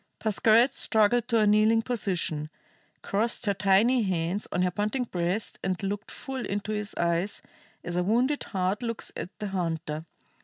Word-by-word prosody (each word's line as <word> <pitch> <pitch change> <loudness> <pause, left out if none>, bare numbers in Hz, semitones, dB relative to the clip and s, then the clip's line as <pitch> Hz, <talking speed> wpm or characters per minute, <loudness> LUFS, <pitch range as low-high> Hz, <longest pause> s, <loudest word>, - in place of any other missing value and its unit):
Pascherette 225 +4 +4
struggled 225 0 +3
to 235 -2 +2
a 215 - +4
kneeling 215 +2 +4
position, 180 -10 -1 0.5
crossed 225 +4 0
her 200 - +2
tiny 205 +6 +3
hands 185 0 -1
on 180 - +1
her 180 - +1
panting 210 +7 -1
breast, 180 -1 -2
and 185 -1 0
looked 205 +2 -3
full 265 -2 -5
into 205 +1 -3
his 210 -1 -3
eyes 170 +3 0 0.4
as 175 - -4
a 180 - +2
wounded 245 +9 +1
hart 190 +1 -1
looks 230 -2 -4
at - - -5
the 210 - -4
hunter. 165 -4 -3
205 Hz, 160 wpm, -27 LUFS, 180-225 Hz, 0.5 s, Pascherette